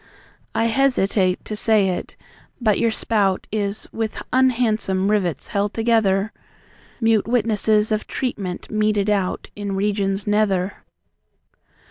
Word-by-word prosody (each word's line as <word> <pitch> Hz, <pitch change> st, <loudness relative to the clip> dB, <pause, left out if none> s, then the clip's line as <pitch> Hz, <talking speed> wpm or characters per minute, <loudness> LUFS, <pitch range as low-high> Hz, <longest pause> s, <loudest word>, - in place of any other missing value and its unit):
I 225 Hz, -, +2 dB
hesitate 215 Hz, -7 st, +1 dB
to 215 Hz, -, -4 dB
say 210 Hz, -2 st, +3 dB
it, 180 Hz, -, -4 dB, 0.4 s
but 215 Hz, -4 st, +2 dB
your 230 Hz, -, +3 dB
spout 205 Hz, -4 st, 0 dB
Is 205 Hz, -1 st, -2 dB
with 225 Hz, -1 st, -3 dB
unhandsome 225 Hz, -6 st, +2 dB
rivets 180 Hz, -9 st, -1 dB
held 205 Hz, 0 st, -1 dB
together 220 Hz, -3 st, +2 dB, 0.7 s
Mute 225 Hz, -3 st, +2 dB
witnesses 220 Hz, -2 st, +2 dB
of 215 Hz, 0 st, -1 dB
treatment 200 Hz, -8 st, -4 dB
meted 210 Hz, -1 st, +1 dB
out 195 Hz, -3 st, -1 dB
In 200 Hz, -1 st, -4 dB
regions 195 Hz, 0 st, 0 dB
nether. 205 Hz, -2 st, +1 dB
210 Hz, 115 wpm, -21 LUFS, 195-225 Hz, 0.7 s, say